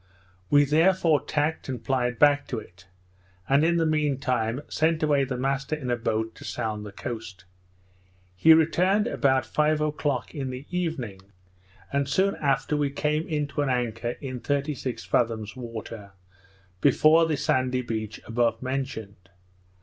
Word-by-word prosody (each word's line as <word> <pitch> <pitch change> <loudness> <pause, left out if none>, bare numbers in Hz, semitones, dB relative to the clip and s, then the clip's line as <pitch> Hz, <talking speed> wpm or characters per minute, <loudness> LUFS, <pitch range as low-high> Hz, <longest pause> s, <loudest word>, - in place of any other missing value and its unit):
We 145 0 +5
therefore 160 +1 +3
tacked, 150 0 -1
and 125 -3 -4
plied 125 -2 0
back 145 -1 +4
to 125 - -3
it; 95 -3 -11 0.6
and, 140 +2 +4
in 170 +1 +3
the 165 - +2
mean 150 -3 +1
time, 125 -2 -1
sent 160 +1 +1
away 145 -2 +3
the 130 -1 -4
master 135 +3 -1
in 130 -5 -4
a - - +3
boat 110 -1 -2
to - - -11
sound 105 -1 -3
the - - -9
coast. 110 -3 -7 0.9
He 160 - +7
returned 185 +6 +3
about 135 - +1
five 150 0 +1
o'clock 150 -3 -1
in 140 -5 -4
the 130 +2 -7
evening; 160 - -3 0.7
and 140 -1 0
soon 195 +7 +2
after 140 +1 0
we 145 -1 +1
came 150 +3 -1 0.2
to 145 +1 -2
an 145 - 0
anchor 120 -1 -1
in 130 -3 -5
thirty 145 +3 -1
six 130 -2 -5
fathoms 110 -2 0
water, 115 -4 -8 0.7
before 160 - +5
the 155 -2 0
sandy 130 -1 0
beach 110 -2 -4
above 115 0 0
mentioned. 110 -8 -5
135 Hz, 155 wpm, -26 LUFS, 115-150 Hz, 0.9 s, He